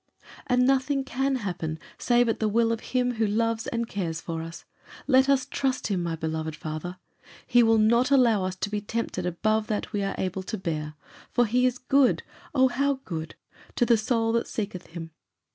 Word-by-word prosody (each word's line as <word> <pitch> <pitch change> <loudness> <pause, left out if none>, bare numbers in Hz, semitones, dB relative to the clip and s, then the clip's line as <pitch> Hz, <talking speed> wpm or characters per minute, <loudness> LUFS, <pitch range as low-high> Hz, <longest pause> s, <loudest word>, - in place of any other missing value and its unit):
"And 250 -1 +3
nothing 270 +1 +2
can 270 +1 0
happen 175 -9 -3 0.2
save 240 0 +3
at 225 - 0
the 220 - +1
will 230 +2 +2
of 230 - -1
Him 250 -1 -1
who 220 -1 +2
loves 230 +2 0
and 235 -1 -2
cares 170 -6 -3
for 165 -1 -4
us. 165 +1 -8 0.4
Let 265 -1 +4
us 275 -2 +3
trust 265 -1 -1
him, 190 -3 0
my 170 -1 -2
beloved 160 -1 -3
father. 155 +4 -5 0.5
He 245 0 +5
will 225 -1 +5
not 235 +4 +4
allow 240 -8 +4
us 185 0 -2
to 205 +2 -4
be 210 -1 -1
tempted 205 -4 -3
above 215 +5 0
that 210 -1 -3
we 205 - 0
are 195 0 -2
able 190 0 -2
to 215 +4 -4
bear. 155 -4 -4 0.4
For 245 - +3
he 250 +3 +3
is 250 0 -1
good 270 +1 +3 0.3
oh, 260 -1 +5
how 280 +3 +1
good! 160 -2 -5 0.4
to 240 - +3
the 235 - +5
soul 225 +1 +1
that 230 0 0
seeketh 200 -4 -5
him. 165 -1 -8
220 Hz, 195 wpm, -26 LUFS, 180-250 Hz, 0.5 s, He